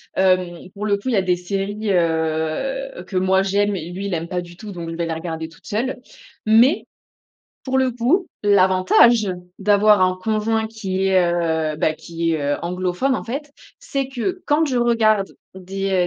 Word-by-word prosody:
Hem 185 -2 +1
pour 210 +1 -4
le 200 -1 +2
coup, 205 - -5
il - - 0
y - - +2
a 195 - +3
des 180 -1 +1
séries, 200 +3 -3
heu, 165 - -1
que 190 - -9
moi 190 +1 +3
j'aime 200 +1 +1
et 170 -1 -6
lui 195 +3 -4
il 200 - -3
aime 165 +1 -4
pas 180 0 -2
du 175 0 -12
tout, 215 0 -8
donc 170 -3 -6
je 165 - -5
vais 170 0 -2
les 165 - -2
regarder 160 -1 -5
toute 165 - -18
seule. 250 +5 -2 0.5
Mais, 235 +7 +5 0.8
pour 265 0 0
le 260 -1 +2
coup, 265 +11 +1
l'avantage 200 +2 +4 0.3
d'avoir 205 0 +4
un 185 0 +3
conjoint 220 +2 0
qui 195 -4 -3
est, 190 -1 +4
heu, 160 -3 0
bah, 155 - +1
qui 165 +1 -3
est, 160 -2 -1
heu, 145 0 0
anglophone 180 +9 -1
en - - -4
fait, 280 +5 -5 0.3
c'est 275 - -3
que 270 +9 -3
quand 300 +2 +3
je 265 -4 -1
regarde 220 -4 +2 0.2
des, 190 0 -1
195 Hz, 190 wpm, -21 LUFS, 175-225 Hz, 0.8 s, Mais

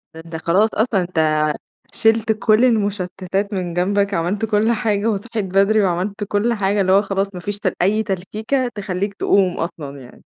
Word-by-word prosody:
ده 160 - -8
أنت 165 -1 -8
خلاص 185 +7 +2
أصلًا 215 -3 +1
أنت 155 -3 +1 0.4
شيلت 225 0 +2
كل 215 +3 +3
المُشتِّتات 200 -3 -1
من 180 -3 -3
جنبك، 200 +3 +1
عملت 190 +6 -1
كل 215 +1 +2
حاجة 215 -2 0
وصحيت 215 0 -3
بدري، 200 +3 +3
وعملت 195 +3 -1
كل 205 +4 0
حاجة، 200 -1 0
اللي 185 0 +2
هو 195 +1 +6
خلاص 195 -1 -2
ما - - -5
فيش 205 +3 -4
ت - - -1
أي 215 +4 +2
تلكيكة 215 +7 -2
تخلّيك 200 0 -3
تقوم 190 -2 +2
أصلًا 145 -5 -5
يعني. 125 - -14
200 Hz, 175 wpm, -20 LUFS, 180-215 Hz, 0.4 s, هو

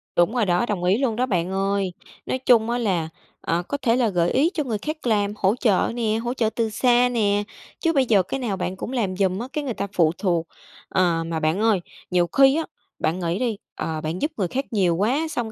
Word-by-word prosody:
Đúng 175 +8 +3
rồi 230 -4 +2
đó, 180 +5 +2
đồng 200 -6 -3
ý 185 +3 +3
luôn 250 -4 0
đó 250 - +1
bạn 185 -6 -1
ơi! 195 -1 0 0.3
Nói 260 - -1
chung 235 -3 +4
á 240 - 0
là, 180 -9 0 0.3
ờ, 170 +1 -1
có 285 - -2
thể 230 0 +3
là 240 -4 +2
gợi 175 -2 +1
ý 305 +7 +3
cho 300 - -1
người 225 -5 -2
khác 305 +2 -5
làm, 205 -2 +1
hỗ 195 +3 +2
trợ 220 -6 +2
nè, 220 -2 0
hỗ 240 +2 -2
trợ 225 -4 +1
từ 225 0 -1
xa 245 +2 +3
nè. 205 -3 +1 0.4
Chứ 330 -1 +1
bây 270 -2 +3
giờ 205 -6 +4
cái 270 - -4
nào 215 -7 -2
bạn 185 0 -3
cũng 205 - -6
làm 210 -8 -1
giùm 190 -1 +1
á, 240 - -4
cái 300 - -2
người 250 -4 -2
ta 200 - -3
phụ 165 -3 +4
thuộc. 170 -5 0 0.4
Ờ, 170 -3 +2
mà 165 -1 -2
bạn 160 +5 0
ơi, 220 -4 +3 0.3
nhiều 175 -1 +3
khi 270 - +5
á, 325 - 0 0.4
bạn 165 +4 0
nghĩ 175 +1 -1
đi, 235 -5 -1 0.2
ờ, 160 -1 -3
bạn 160 +3 -4
giúp 300 +2 0
người 190 - 0
khác 270 +10 -2
nhiều 185 -6 +2
quá, 260 - +1
xong 240 -7 -3
210 Hz, 250 wpm, -23 LUFS, 180-245 Hz, 0.4 s, khi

